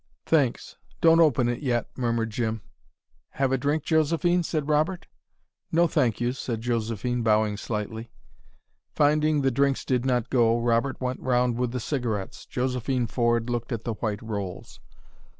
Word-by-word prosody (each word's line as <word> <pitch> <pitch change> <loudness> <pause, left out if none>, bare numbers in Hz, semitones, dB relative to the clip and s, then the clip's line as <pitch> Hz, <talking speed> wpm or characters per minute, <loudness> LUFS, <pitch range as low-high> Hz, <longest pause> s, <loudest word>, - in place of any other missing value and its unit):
"Thanks 140 -7 0 0.2
don't 165 0 +5
open 135 -7 +4
it 120 0 -2
yet," 120 -5 0
murmured 115 -3 -1
Jim. 110 -2 -2 0.7
"Have 135 -1 0
a 135 - +2
drink, 145 +3 0
Josephine?" 165 +3 +2
said 155 -3 -2
Robert. 155 +4 +1 0.7
"No 170 +1 +4
thank 130 -9 +1
you," 120 +1 0
said 120 -4 -4
Josephine, 120 0 -1
bowing 110 -2 +2
slightly. 110 +2 -5 0.9
Finding 150 0 +3
the 135 - +3
drinks 140 +2 +1
did 125 -2 +1
not 125 -2 0
go, 115 -2 +3
Robert 120 +3 0
went 130 0 -3
round 125 -1 +1
with 125 -1 0
the 125 - -3
cigarettes. 115 -7 -3
Josephine 125 -1 -1
Ford 120 0 0
looked 120 0 -3
at 115 -2 -3
the 115 - -2
white 105 -1 -3
rolls. 100 -5 -6
125 Hz, 150 wpm, -26 LUFS, 115-140 Hz, 0.9 s, don't